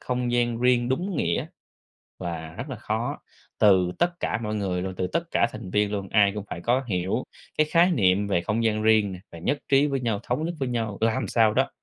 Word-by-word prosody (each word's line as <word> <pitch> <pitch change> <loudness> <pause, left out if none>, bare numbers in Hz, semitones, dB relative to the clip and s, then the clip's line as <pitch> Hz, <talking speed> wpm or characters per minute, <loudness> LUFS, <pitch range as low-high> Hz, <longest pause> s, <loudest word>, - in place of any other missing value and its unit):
không 125 -1 -2
gian 120 -1 +1
riêng 125 -1 +3
đúng 175 +7 -1
nghĩa - - 0 0.7
là 80 -3 -5
rất 145 - -6
là 130 - -4
khó. 115 +5 -3 0.4
Từ 95 -4 +4
tất 175 0 0
cả 110 - -1
mọi 105 0 -2
người 95 -4 -1
luôn, 95 0 -4
từ 90 - -1
tất 170 - -1
cả 115 - +3
thành 110 -3 -8
viên 105 +1 +1
luôn, 100 -2 -3
ai 100 -2 +4
cũng 105 -1 -5
phải 85 - -5
có 125 +7 +1
hiểu 95 +4 -1 0.3
cái 155 - +4
khái 175 +2 +5
niệm 100 - +2
về 85 -4 +1
không 110 +4 -1
gian 110 -1 +1
riêng 110 -2 +4
nè, 90 - -7
và 85 - -9
nhất 140 - -1
trí 140 +1 +4
với 135 -2 -1
nhau, 115 -4 -1
thống 135 +6 -1
nhất 175 - -2
với 135 - -1
nhau, 115 -4 -2
làm 115 0 +1
sao 110 -2 +3
đó - - +2
110 Hz, 235 wpm, -25 LUFS, 100-125 Hz, 0.7 s, khái